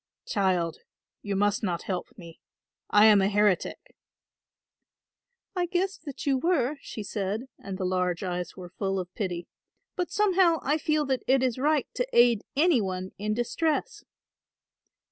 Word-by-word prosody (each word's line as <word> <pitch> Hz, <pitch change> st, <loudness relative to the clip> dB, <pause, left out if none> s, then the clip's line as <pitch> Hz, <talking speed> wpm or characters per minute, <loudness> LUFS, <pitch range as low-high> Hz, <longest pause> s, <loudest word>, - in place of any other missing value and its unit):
"Child, 180 Hz, -5 st, 0 dB, 0.4 s
you 205 Hz, -1 st, -3 dB
must 205 Hz, +1 st, +1 dB
not 175 Hz, -5 st, -2 dB
help 185 Hz, -2 st, -3 dB
me. 170 Hz, -4 st, -12 dB, 0.5 s
I 210 Hz, +1 st, +6 dB
am 210 Hz, -2 st, +7 dB
a 190 Hz, -, +2 dB
heretic." 205 Hz, -3 st, 0 dB, 1.6 s
"I 355 Hz, -1 st, 0 dB
guessed 375 Hz, +1 st, -2 dB
that 285 Hz, -3 st, -7 dB
you 270 Hz, -2 st, +2 dB
were," 295 Hz, -3 st, +1 dB
she 215 Hz, -, -7 dB
said, 205 Hz, +2 st, -3 dB, 0.2 s
and 195 Hz, -1 st, -6 dB
the 185 Hz, -, -2 dB
large 180 Hz, 0 st, 0 dB
eyes 180 Hz, -2 st, -4 dB
were 180 Hz, -2 st, -9 dB
full 195 Hz, -1 st, 0 dB
of 180 Hz, -1 st, -5 dB
pity, 175 Hz, -4 st, -3 dB, 0.5 s
"but 360 Hz, -1 st, -2 dB
somehow 375 Hz, -5 st, +3 dB
I 295 Hz, +4 st, +1 dB
feel 305 Hz, 0 st, +1 dB
that 265 Hz, -2 st, 0 dB
it 265 Hz, 0 st, +4 dB
is 255 Hz, -1 st, 0 dB
right 295 Hz, +1 st, +2 dB
to -, -, -1 dB
aid 235 Hz, -3 st, +5 dB, 0.2 s
any 310 Hz, -5 st, +4 dB
one 185 Hz, -1 st, -4 dB
in 215 Hz, +1 st, -1 dB
distress." 315 Hz, -, -1 dB
215 Hz, 155 wpm, -27 LUFS, 190-295 Hz, 1.6 s, am